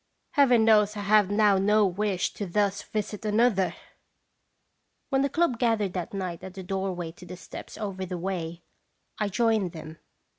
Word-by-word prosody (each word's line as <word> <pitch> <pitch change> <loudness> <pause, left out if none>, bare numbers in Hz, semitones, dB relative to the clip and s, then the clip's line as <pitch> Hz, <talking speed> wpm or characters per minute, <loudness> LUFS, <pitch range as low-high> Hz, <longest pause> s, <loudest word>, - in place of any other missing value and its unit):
" - - -49
Heaven 250 -6 +4
knows 210 -1 +4
I - - -3
have 205 -1 +4
now 205 -1 +4
no 210 +2 +4
wish 195 0 -1
to 205 - -5
thus 200 +2 0
visit 210 -1 -4
another! 215 -3 +2 1.3
When 270 -1 +2
the 280 - +1
club 325 -6 +1
gathered 220 -6 +1
that 180 -3 -4
night 185 -3 -4
at 190 0 -9
the 190 - -7
doorway 185 -3 -3
to 180 +2 -14
the 180 +1 -8
steps 165 - -10
over 195 -3 -4
the 180 0 -4
way, 170 -2 -4 0.6
I 210 - +1
joined 215 -3 +1
them. 160 -1 -9
200 Hz, 175 wpm, -27 LUFS, 185-215 Hz, 1.3 s, Heaven